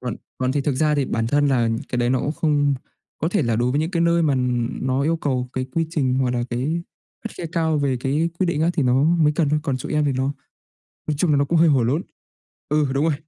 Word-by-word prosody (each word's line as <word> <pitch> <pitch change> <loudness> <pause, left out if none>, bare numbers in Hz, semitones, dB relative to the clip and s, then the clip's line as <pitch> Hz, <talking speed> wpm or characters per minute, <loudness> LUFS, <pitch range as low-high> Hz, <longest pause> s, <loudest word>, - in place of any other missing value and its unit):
Còn 125 -3 -4 0.2
còn 130 0 0
thì 145 - 0
thực 140 -1 -1
ra 150 +2 +2
thì 140 -2 +1
bản 115 -2 -1
thân 145 +3 +2
là 120 -4 +2 0.2
cái 125 - -2
đấy 120 0 +1
nó 130 - +2
cũng 150 - -1
không 145 -3 +1 0.4
có 160 - 0
thể 180 -4 +1
là 115 -2 0
đối 120 +2 +1
với 145 +3 +1
những 160 +3 -1
cái 170 - -1
nơi 170 0 +3
mà, 145 -4 +2
ừ, - - 0 0.4
nó 130 +1 0
yêu 165 +3 +1
cầu 130 -5 -2
cái 130 0 -3
quy 165 -1 +1
trình 135 -6 0
hoặc 130 -1 +1
là 120 -1 -1
cái 145 +8 -1 0.4
khắt 225 - -5
khe 175 - -6
cao 160 -2 +1
về 135 -3 0
cái 150 +6 0
quyết 185 - +1
định 155 -3 -1
á, 170 - +3
thì 155 - +1
nó 130 +2 +3
mới 160 -2 +3
cần 155 -4 +2
thôi, 150 +1 +1
còn 140 -5 -1
chỗ 130 - -6
em 150 0 +2
thì 140 - +1
nó 130 +2 -1 0.8
nói 150 - +1
chung 170 -2 +2
là 145 - +4
nó 140 - +3
cũng 165 +3 +1
hơi 165 0 +5
hổ 135 -5 +3
lốn. 140 +10 0 0.7
Ừ, 150 -1 +2
đúng 140 +3 +1
rồi, 160 - +2
145 Hz, 280 wpm, -22 LUFS, 130-160 Hz, 0.8 s, hơi